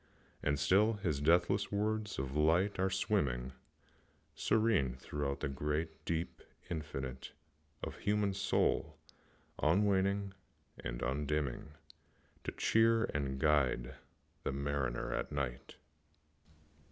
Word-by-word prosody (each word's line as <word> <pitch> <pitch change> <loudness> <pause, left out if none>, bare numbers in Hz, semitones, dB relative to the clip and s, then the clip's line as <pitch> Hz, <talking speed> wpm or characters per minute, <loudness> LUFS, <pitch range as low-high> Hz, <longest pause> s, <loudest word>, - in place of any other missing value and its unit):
And 70 0 +1
still 95 +10 +4
his 85 -9 -2
deathless 90 +6 +3
words 105 0 -1
of 65 +1 -3
light 85 +7 +3
are 95 +1 +2
swimming 60 -7 0 0.8
Serene 105 - +2
throughout 70 +1 -3
the 75 - 0
great, 75 +4 -3
deep 85 0 -2 0.3
infinite 70 -5 -5 0.5
Of - - -5
human 105 -1 +1
soul, 100 - +1 0.6
unwaning 100 +3 +2 0.5
and - - -5
undimming, 75 +2 -1 0.7
To - - -1
cheer 115 0 +4
and 70 -2 -1
guide 65 -4 +2 0.5
the - - -2
mariner 70 -2 -1
at - - -2
night. 70 -4 -4
75 Hz, 105 wpm, -34 LUFS, 70-100 Hz, 0.8 s, still